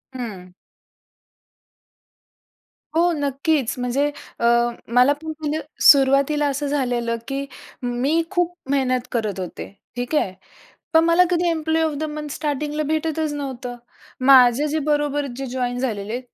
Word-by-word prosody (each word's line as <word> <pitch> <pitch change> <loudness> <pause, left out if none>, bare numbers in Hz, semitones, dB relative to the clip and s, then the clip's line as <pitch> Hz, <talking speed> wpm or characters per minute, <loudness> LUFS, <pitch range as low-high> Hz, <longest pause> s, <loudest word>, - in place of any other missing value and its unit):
हं. 200 -8 -7 2.4
हो, 345 +2 +4
नक्कीच, 285 -2 0
म्हणजे 250 +3 0 0.3
अ, 235 - 0 0.4
मला 250 +4 +4
पण 305 +2 -12
म्हणजे 305 0 -2 0.2
सुरुवातीला 280 +2 +5
असं 285 +1 -2
झालेलं, 245 -5 -1
की 275 0 -3 0.4
मी 260 +7 +1
खूप 355 -2 0 0.2
मेहनत 255 -3 +1
करत 215 -5 -2
होते, 180 -2 -6 0.3
ठीक 245 +5 -3
आहे. 190 -10 +1 0.6
पण 320 0 +6
मला 335 +2 +5
कधी 350 -1 +1
एम्प्लॉयी 320 0 0
ऑफ 315 - -1
द 310 - -3
मंथ 300 0 -6
स्टार्टिंगला 300 +1 -2
भेटतच 315 0 -1
नव्हतं. 260 -4 -5 0.5
माझे 260 +1 +6
जे 310 +1 -1
बरोबर 290 -1 +1
जे 270 - -4
जॉइन 245 -1 -2
झालेले, 225 -2 -3
280 Hz, 130 wpm, -22 LUFS, 245-305 Hz, 2.4 s, पण